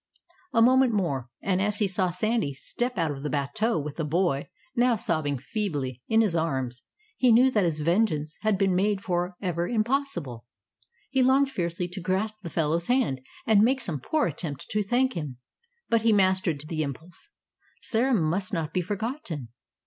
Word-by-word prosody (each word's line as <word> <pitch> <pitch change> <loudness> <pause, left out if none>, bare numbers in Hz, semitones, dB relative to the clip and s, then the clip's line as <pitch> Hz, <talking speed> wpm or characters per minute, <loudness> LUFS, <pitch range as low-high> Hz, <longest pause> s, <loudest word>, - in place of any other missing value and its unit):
A 230 - +4
moment 255 0 +5
more, 140 - -1
and 190 -1 +1
as 205 +1 0
he 205 - +2
saw 185 -1 +1
Sandy 215 -2 0
step 240 - -3
out 165 -3 +1
of 135 -1 -6
the 150 - -3
"bateau" 210 - 0
with 150 -1 -4
the 165 - -1
boy, 155 -2 0 0.3
now 245 -1 +4
sobbing 155 -8 0
feebly, 140 - -3
in 225 0 +4
his 205 -6 +1
arms 130 -7 -1 0.4
he 250 -2 +4
knew 250 +3 +6
that 210 -5 +2
his 160 -2 -1
vengeance 160 -3 +1
had 215 -2 +2
been 195 -1 +2
made 200 +2 +1
for 180 0 -1
ever 175 -2 -1
impossible. 215 - -1 0.6
He 265 -1 +2
longed 265 +2 +4
fiercely 175 -4 -2
to 190 +2 -7
grasp 205 +5 -1
the 170 - -6
fellow's 165 +1 0
hand, 245 - +1 0.2
and 220 -3 +5
make 260 +5 +3
some 175 - -4
poor 305 - 0
attempt 150 -3 -4
to 210 - +1
thank 250 +5 +1
him. 150 - -5 0.5
But 230 -1 +2
he 225 0 +3
mastered 185 -6 +2
the 155 -1 -2
impulse 160 - -7 0.5
Sarah 245 +2 +2
must 185 +1 0
not 165 -3 -2
be 180 - +1
forgotten. 195 - -4
185 Hz, 180 wpm, -27 LUFS, 155-225 Hz, 0.6 s, knew